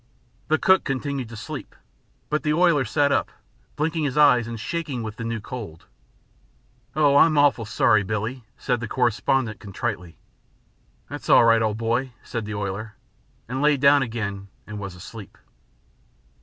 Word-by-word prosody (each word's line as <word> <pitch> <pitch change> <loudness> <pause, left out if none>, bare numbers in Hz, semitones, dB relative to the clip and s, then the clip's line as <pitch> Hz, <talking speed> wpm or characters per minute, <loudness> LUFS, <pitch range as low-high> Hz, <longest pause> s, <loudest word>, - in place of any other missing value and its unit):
The 155 - +3
cook 190 +3 +4
continued 135 -2 -3
to 115 - -9
sleep, - - -8 0.6
but 150 - +1
the 150 - 0
oiler 165 -6 +3
sat 140 +6 +1
up, - - +1 0.5
blinking 160 +1 -1
his 140 0 -2
eyes 125 -6 +5
and 115 -1 -6
shaking 145 -3 -4
with 110 -1 -6
the 115 - -5
new 115 0 -3
cold. 105 -9 -8 1.1
"Oh, 145 -2 +4
I'm 155 0 +5
awful 145 -5 +3
sorry, 110 0 +3
Billie," 110 +5 -3
said 125 -3 -1
the 115 - -5
correspondent 120 -1 0
contritely. 100 -4 -5 0.9
"That's - - -8
all - - +7
right, 115 -1 +5
old 110 -1 0
boy," 120 +3 -1
said 115 -3 -5
the 105 0 -5
oiler, 105 +2 -4 0.5
and 130 +3 -3
lay 150 0 +4
down 140 +1 +5
again 105 -5 -4 0.2
and 105 0 -7
was 100 -3 -7
asleep. 100 +3 -11
120 Hz, 155 wpm, -24 LUFS, 110-140 Hz, 1.1 s, all